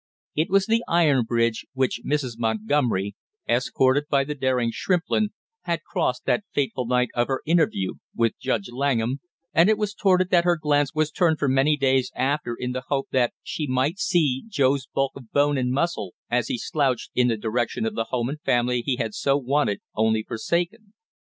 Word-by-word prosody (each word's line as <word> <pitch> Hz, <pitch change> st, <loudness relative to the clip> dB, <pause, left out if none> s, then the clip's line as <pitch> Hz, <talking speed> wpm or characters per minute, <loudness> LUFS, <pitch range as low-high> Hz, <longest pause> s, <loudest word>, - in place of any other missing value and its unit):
It 155 Hz, +3 st, +1 dB
was 195 Hz, +1 st, +3 dB
the 230 Hz, +2 st, +1 dB
iron 150 Hz, -8 st, +3 dB
bridge 115 Hz, -1 st, 0 dB
which 130 Hz, -2 st, 0 dB
Mrs. 130 Hz, -6 st, -2 dB
Montgomery, 110 Hz, -2 st, 0 dB, 0.3 s
escorted 130 Hz, +3 st, +2 dB
by 140 Hz, -1 st, +3 dB
the 150 Hz, +2 st, -4 dB
daring 130 Hz, -4 st, 0 dB
Shrimplin, 180 Hz, -, 0 dB, 0.4 s
had -, -, -1 dB
crossed -, -, -2 dB
that -, -, +1 dB
fateful 130 Hz, -3 st, -1 dB
night 125 Hz, 0 st, +2 dB
of 120 Hz, 0 st, +1 dB
her 135 Hz, -1 st, -1 dB
interview 155 Hz, -, +1 dB, 0.2 s
with 115 Hz, -1 st, +2 dB
Judge 115 Hz, +1 st, -2 dB
Langham, 130 Hz, -1 st, 0 dB, 0.3 s
and 170 Hz, +5 st, +5 dB
it 220 Hz, -, +3 dB
was 210 Hz, -1 st, -2 dB
toward 190 Hz, -3 st, +3 dB
it 185 Hz, -, -2 dB
that 175 Hz, -1 st, +5 dB
her 175 Hz, -1 st, +2 dB
glance 145 Hz, -1 st, +1 dB
was 155 Hz, 0 st, +1 dB
turned 165 Hz, -3 st, +2 dB
for 145 Hz, -, 0 dB
many 135 Hz, +3 st, +3 dB
days 130 Hz, -2 st, +2 dB
after 130 Hz, -2 st, -1 dB
in 125 Hz, +1 st, -4 dB
the 130 Hz, 0 st, -5 dB
hope 135 Hz, -1 st, -1 dB
that 125 Hz, -2 st, +2 dB
she 150 Hz, -, -4 dB
might 130 Hz, +7 st, 0 dB
see 155 Hz, -9 st, +1 dB
Joe's 140 Hz, -, +1 dB
bulk 135 Hz, 0 st, -1 dB
of 125 Hz, -5 st, -12 dB
bone 145 Hz, 0 st, +3 dB
and 125 Hz, -1 st, 0 dB
muscle 135 Hz, -, -1 dB, 0.2 s
as 120 Hz, -1 st, +1 dB
he -, -, -2 dB
slouched 135 Hz, -1 st, -1 dB
in 125 Hz, -1 st, +3 dB
the 115 Hz, -2 st, +1 dB
direction 120 Hz, -, -1 dB
of 225 Hz, -, -2 dB
the 115 Hz, -, -2 dB
home 120 Hz, 0 st, -2 dB
and 150 Hz, +3 st, -5 dB
family 120 Hz, -1 st, +1 dB
he 130 Hz, -, 0 dB
had 115 Hz, -4 st, -3 dB
so 140 Hz, +4 st, +1 dB
wanted 135 Hz, -5 st, 0 dB
only 110 Hz, 0 st, +1 dB
forsaken. 175 Hz, -, -3 dB
135 Hz, 190 wpm, -24 LUFS, 120-155 Hz, 0.4 s, and